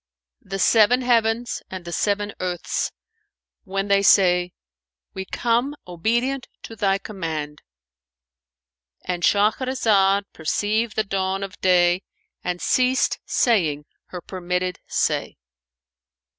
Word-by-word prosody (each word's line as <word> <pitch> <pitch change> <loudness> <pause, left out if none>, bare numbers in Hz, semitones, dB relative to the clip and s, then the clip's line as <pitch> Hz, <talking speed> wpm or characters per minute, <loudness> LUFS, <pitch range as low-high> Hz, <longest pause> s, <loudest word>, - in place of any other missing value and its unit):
"The 195 0 -5
seven 230 +5 +4
heavens 235 -1 +1
and 185 -2 -7
the 170 - -6
seven 205 +2 -1
earths, 180 -1 -2 0.7
when 195 +1 -2
they 200 0 +4
say, 180 -3 +4 0.6
'We 190 - -5
come 240 +7 0
obedient 235 +9 -1 0.2
to 225 - -9
Thy 195 -2 +1
command.'"[FN#445]—And 65 - -9
Shahrazad 205 -2 +2
perceived 210 +7 -1
the 220 - +1
dawn 195 -1 -2
of 195 0 -8
day 180 -1 +4 0.4
and 180 0 -2
ceased 255 +5 +2
saying 160 - +1 0.2
her 180 - -8
permitted 180 0 -3
say. - - -1
190 Hz, 105 wpm, -23 LUFS, 175-220 Hz, 0.7 s, seven